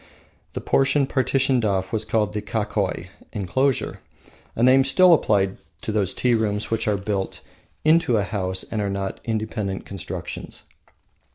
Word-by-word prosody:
The - - -4
portion 135 +1 +2
partitioned 130 -1 +1
off 95 -2 0
was 110 -1 0
called 110 -1 0
the 105 - -2
Kakoi 105 -4 -2 0.2
(enclosure), 125 +7 0 0.6
a 115 - 0
name 130 +2 +6
still 170 +7 +6
applied 100 -10 +2 0.3
to - - -2
those 100 -3 0
tea 125 -1 +2
rooms 110 -2 0
which 115 0 0
are 105 -1 +2
built 100 -1 -3 0.4
into 155 -7 +4
a 105 - +1
house 95 -2 -2
and 110 - -3
are 100 - -1
not 95 0 -3
independent 110 -3 -3
constructions. 100 -5 -7
110 Hz, 150 wpm, -23 LUFS, 100-125 Hz, 0.6 s, name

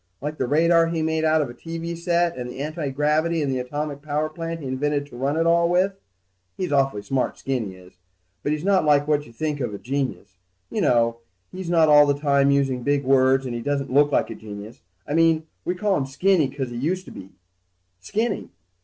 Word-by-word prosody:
Like 150 +2 -5
the 130 - 0
radar 165 +4 +4
he 165 -1 -1
made 160 0 0
out 155 -1 +3
of 135 - -6
a - - -11
TV 165 +5 -6
set 170 0 +1
and 125 -1 -5
the 130 - -8
antigravity 150 +2 0
and 140 - -1
the 130 - -1
atomic 145 +3 -4
power 150 +1 -1
plant 165 +1 -5
he - - -7
invented 145 +2 -1
to 145 - -14
run 135 +5 -1
it 165 - +2
all 170 0 +3
with. 185 +3 +2 0.6
He's 180 -4 -3
awful 135 -7 +1
smart, 135 +1 -1
Skinny 120 -8 -3
is, 90 0 -18 0.4
but 145 - -1
he's 155 +1 -2
not 195 -2 +3
like 145 -1 +3
what 150 -1 +1
you - - -14
think 150 +4 -3
of 120 -6 -3
a - - -5
genius. 130 -7 -4 0.3
You 215 - -1
know, 115 -6 +2 0.3
he's 185 -2 -6
not 165 -2 +4
all 150 -1 +7
the 140 0 +1
time 140 -1 +3
using 135 -2 +1
big 145 +2 +1
words, 135 0 +3
and 125 - -4
he 120 - -4
doesn't 140 0 -2
look 145 +1 +4
like - - +1
a - - -6
genius. 105 +3 -10 0.3
I - - -3
mean, 165 -1 +3 0.2
we 180 - -1
call 200 +1 +1
him 135 - -2
Skinny 160 +1 +2
'cause 135 -2 -5
he 120 - -5
used 180 +9 -1
to - - -11
be 95 0 -11 0.7
Skinny. 210 - -2
145 Hz, 220 wpm, -23 LUFS, 130-165 Hz, 0.7 s, all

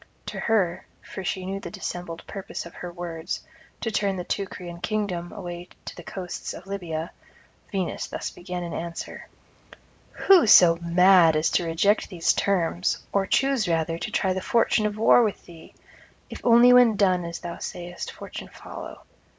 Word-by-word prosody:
To - - -6
her 190 -5 0 0.2
for 190 - -7
she 185 0 -3
knew 195 +1 -3
the 175 - -7
dissembled 170 -1 -6
purpose 195 -4 -6
of 170 - -11
her 175 - -7
words, 170 -1 -5 0.4
to 225 - -2
turn 200 -2 0
the 180 - -3
Teucrian 175 -2 -5
kingdom 190 -5 -2
away 175 -3 -7 0.2
to - - -7
the - - -9
coasts 180 +1 -6
of 175 - -11
Libya 170 -5 -4 0.6
Venus 190 -3 -2
thus - - -5
began 180 0 -6
in 170 - -5
answer: 170 0 -6 0.9
'Who 375 - +5
so 175 -5 +8
mad 170 -1 +5
as 155 +1 +1
to 175 - +1
reject 200 +6 +2
these 175 -5 +1
terms, 180 -2 0
or 195 -1 +1
choose 270 -5 +2
rather 165 0 0
to - - -4
try 190 -3 +1
the 190 - -3
fortune 220 0 +2
of 210 0 -5
war 225 +2 +6
with 215 -4 -1
thee? 165 -2 -14 0.6
if - - -8
only 240 +1 +7
when 245 -3 +6
done, 185 -3 +2
as 170 0 -5
thou 170 -1 -7
sayest, 175 0 -6
fortune - - -9
follow. - - -10
180 Hz, 170 wpm, -25 LUFS, 170-200 Hz, 0.9 s, so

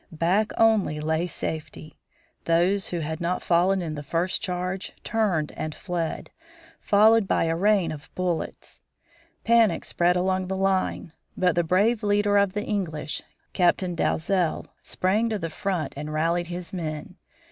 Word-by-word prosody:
Back 180 +7 +1
only, 215 -9 +3
lay 160 +3 0
safety. 155 -2 -6 0.5
Those 180 +4 +2
who 175 -2 -3
had 160 +2 -4
not 175 +2 -1
fallen 180 +2 +2
in 160 -2 -4
the 145 - -5
first 170 +5 -1
charge 180 +1 -3
turned 195 -9 0
and 155 -1 -5
fled, 175 -4 -4 0.5
followed 215 +1 +4
by - - +2
a 165 0 0
rain 195 -2 +2
of 150 0 -9
bullets. 180 -3 -3 0.6
Panic 230 -5 +3
spread 175 +1 +2
along 185 +1 0
the 190 +1 -2
line. 190 -3 0 0.2
But 180 -2 +3
the 175 - +1
brave 205 +7 +2
leader 205 -1 +2
of 200 -2 +1
the 210 0 -3
English, 160 -7 -3 0.3
Captain 180 0 +2
Dalzel, 175 +1 0 0.2
sprang 210 +5 0
to 220 - -1
the 165 -4 -4
front 180 0 -2
and 150 +2 -5
rallied 165 +3 0
his 175 +1 -6
men. 160 0 -5
180 Hz, 150 wpm, -25 LUFS, 165-195 Hz, 0.6 s, followed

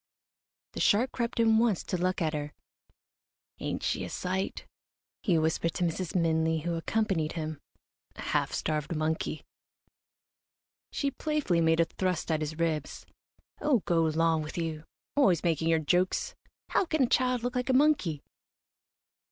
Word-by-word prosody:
The - - -5
shark 240 +6 +3
crept 235 0 -2
in 225 -1 +5
once 225 -6 +2
to - - -3
look 180 0 0
at 155 0 0
her. 150 0 -4 1.1
"Ain't - - -3
she - - 0
a - - -5
sight?" 190 +1 -3 0.6
he 180 -6 +2
whispered 160 +1 0
to - - -1
Mrs. 175 +1 -2
Minley, 160 -2 +2
who 170 0 -1
accompanied 165 -2 0
him, 155 -2 -4 0.6
"a - - -8
half - - 0
starved 155 +1 -2
monkey." 155 0 -2 1.5
She 280 -1 -1
playfully 295 - 0
made 160 0 +3
a 165 - +5
thrust 180 -2 -2
at 155 - +1
his 155 +1 -3
ribs. 160 -3 -2 0.6
"Oh, 275 -8 +2
go 170 -1 +2
'long 160 0 +2
with 155 +2 -7
you 160 -2 -3 0.3
always 190 - +4
making 165 -2 +1
your 165 0 +4
jokes! 175 +4 +1 0.4
How - - +2
can 315 -4 +1
a - - +3
child 250 -1 +1
look 245 +1 -2
like 250 +1 -1
a - - +4
monkey?" 255 - +2
170 Hz, 155 wpm, -29 LUFS, 160-225 Hz, 1.5 s, in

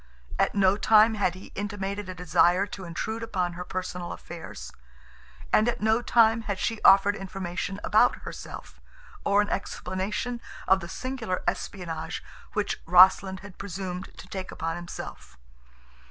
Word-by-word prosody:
At - - +2
no 195 0 +4
time 220 +1 +6
had 200 -5 0
he 185 - -12
intimated 200 -1 -4
a 185 - -5
desire 180 +2 +3
to 195 -2 -8
intrude 220 +7 -4
upon 185 -6 -1
her 175 +1 -5
personal 180 -1 -4
affairs, 170 -1 -8 0.8
and 215 +3 +5
at - - -2
no 220 +2 +2
time 230 -1 +4
had 205 -3 -3
she 225 +2 -2
offered 200 +1 +6
information 195 -1 -4
about 215 +4 +4
herself, - - -9 0.4
or 200 +1 +4
an 205 - -6
explanation 200 +6 -3 0.3
of 190 0 +5
the 170 -1 -8
singular 235 -6 -3
espionage 165 -4 -3 0.3
which 205 -1 -1
Rossland 190 +2 +6
had 205 -2 -12
presumed 190 -1 -5
to - - -11
take 190 -1 -6
upon 165 0 -3
himself. 65 - -8
195 Hz, 145 wpm, -27 LUFS, 180-210 Hz, 0.8 s, time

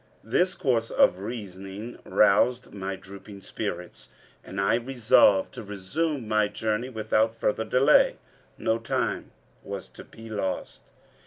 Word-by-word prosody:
This 180 - +1
course 115 -4 0
of 90 - +3
reasoning 100 0 -7
roused 105 +4 +3
my 95 -1 -4
drooping 100 +1 -12
spirits, 90 -4 -6 0.3
and 100 - -6
I 100 +3 +2
resolved 115 -5 +4
to - - -7
resume 115 - -3
my 110 -1 +2
journey 110 +3 -2
without 110 -1 0
further 110 0 0
delay. 135 +4 +4 0.4
No 110 +1 0
time 115 - -2 0.3
was - - -6
to - - -12
be 115 0 -13
lost. 100 -4 -4
110 Hz, 130 wpm, -26 LUFS, 100-115 Hz, 0.4 s, resolved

